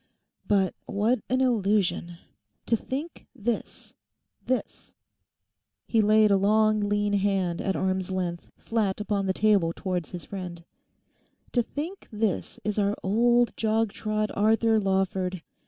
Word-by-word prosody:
But 195 -2 +2
what 220 +5 +1
an 255 +1 +2
illusion. 200 -7 +1 0.5
To 230 - +3
think 280 +8 -6
this—this—he 235 -1 -4 2.1
laid 215 0 +5
a 200 - +5
long 215 +2 +3
lean 205 0 0
hand 195 -4 +1
at 195 - -1
arm's 190 -1 -1
length 180 -2 -3
flat 215 -4 -1
upon 205 -2 -1
the 190 - +1
table 200 -6 +3
towards 180 -5 -3
his 175 -2 -7
friend—'to 180 +6 -7
think 315 - -6
this 210 -3 -2
is 210 0 -1
our 200 0 +1
old 240 +4 +3
jog 220 -1 +1
trot 215 -1 -2
Arthur 220 +1 +3
Lawford! 190 -2 -1
205 Hz, 120 wpm, -26 LUFS, 190-220 Hz, 2.1 s, laid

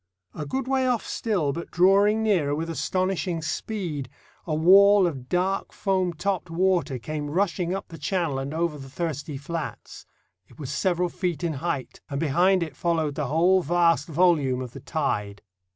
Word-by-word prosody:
A 150 -2 -6
good 265 - -3
way 265 -1 +1
off 245 -3 0
still, 180 -11 -1
but 170 - -6
drawing 200 +4 +4
nearer 170 -10 +2
with 165 +2 -3
astonishing 185 -1 -1
speed, 160 - -4 0.4
a 155 - 0
wall 195 +4 +6
of 135 -7 -4
dark 185 +2 0
foam 190 -2 0
topped 180 +1 -2
water 170 -5 +1
came 145 +4 -5
rushing 180 +1 0
up 195 - -6
the 165 -2 -10
channel 155 -3 -1
and 135 +1 -4
over 160 -1 -1
the 135 0 -10
thirsty 150 -1 -4
flats. 160 +3 -6 0.4
It - - -20
was 140 -3 -5
several 175 +4 0
feet 175 -2 -3
in 165 -2 0
height, 145 -1 -4
and 140 -1 -3
behind 175 +5 +3
it 155 -4 -7
followed 160 -3 0
the 145 -2 -2
whole 175 +6 +3
vast 170 +1 +2
volume 155 -6 +2
of 125 -2 -6
the - - -9
tide. 105 -10 -2
170 Hz, 170 wpm, -25 LUFS, 145-185 Hz, 0.4 s, wall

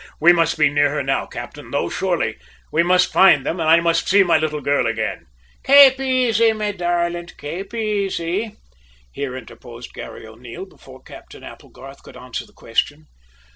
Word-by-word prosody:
"We 175 +3 +6
must 165 -1 +1
be 155 -1 +4
near 145 0 +2
her 145 - -1
now, 135 +1 -1
captain, - - -9
though, - - -1
surely. - - -2 0.3
We 155 - +2
must 180 +1 +2
find 190 -8 +5
them, 170 - -3
and 160 -1 0
I 165 +1 +6
must 170 -1 0
see 200 0 +5
my 175 - +2
little 150 -1 -2
girl 145 -3 0
again!" 110 -3 -4 0.4
"Kape 275 -1 +7
aisy, 245 -4 +2
me 210 -1 -3
darlint; 175 -2 -3
kape 180 +7 -7
aisy," 205 -2 -3 0.6
here 130 - -5
interposed 120 -1 -12
Garry - - -10
O'Neil, 115 +10 -10
before 130 -8 -17
Captain - - -14
Applegarth - - -13
could - - -14
answer - - -7
the - - -22
question. 75 -1 -3
170 Hz, 170 wpm, -20 LUFS, 145-200 Hz, 0.6 s, Kape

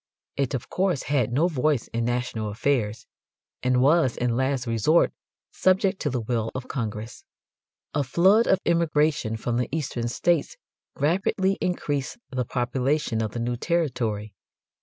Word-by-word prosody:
It 135 -1 0
of 125 - -5
course 185 -6 0
had 130 -5 0
no 150 +8 +3
voice 150 -5 0
in 115 0 -2
national 120 -3 -2
affairs, 110 -1 -1 0.6
and 125 0 +2
was 145 -3 +3
in 120 -1 0
last 130 0 0
resort 115 +8 +3 0.4
subject 190 +1 +2
to 145 - 0
the 125 -3 -2
will 115 -1 -1
of 130 -1 -5
Congress. 110 -3 -5 0.7
A 145 - +1
flood 190 - +4
of 190 - +4
immigration 155 -8 +1
from 120 +1 -2
the 125 -1 -1
eastern 135 -6 -2
states 170 - 0 0.4
rapidly 190 +5 +1
increased 145 -7 -2
the 130 -1 -1
population 125 0 0
of 110 -1 -3
the 120 - -3
new 120 +1 -1
territory. 115 - -1
130 Hz, 145 wpm, -25 LUFS, 115-155 Hz, 0.7 s, flood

